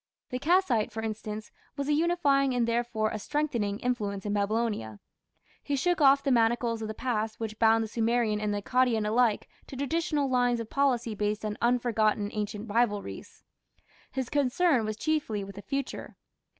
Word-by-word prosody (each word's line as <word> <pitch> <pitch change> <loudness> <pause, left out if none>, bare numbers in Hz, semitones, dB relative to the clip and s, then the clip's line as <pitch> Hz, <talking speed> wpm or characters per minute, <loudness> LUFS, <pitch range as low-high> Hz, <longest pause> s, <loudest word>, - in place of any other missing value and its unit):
The 250 - -2
Kassite, 295 - +2
for 220 0 -5
instance, 215 -1 -5 0.3
was 280 0 -2
a 300 - +2
unifying 290 -5 +2
and 240 -1 +1
therefore 230 -2 0
a 215 - -4
strengthening 235 -6 -1
influence 210 -6 -2
in 205 - -1
Babylonia. 205 - -1 0.6
He 285 - -2
shook 350 +5 +1
off 275 0 +6
the 275 - +1
manacles 230 -1 +2
of 220 - -3
the 215 - -5
past 220 -3 -2
which 220 -1 -5
bound 225 0 +4
the - - -4
Sumerian 225 -1 0
and 210 -1 -1
the 205 0 -2
Akkadian 245 -4 +2
alike 225 -1 +2 0.2
to - - -9
traditional 290 +1 0
lines 245 -2 +2
of 225 -1 -6
policy 250 -5 +1
based 210 +1 -2
on 210 -1 -2
unforgotten 225 -4 +1
ancient 210 +1 -4
rivalries. 210 -2 -2 0.7
His 260 -2 -3
concern 280 -2 +2
was 215 0 -3
chiefly 285 -9 -1
with 200 0 -8
the 200 - -8
future. 275 +4 -5
230 Hz, 170 wpm, -28 LUFS, 215-265 Hz, 0.7 s, off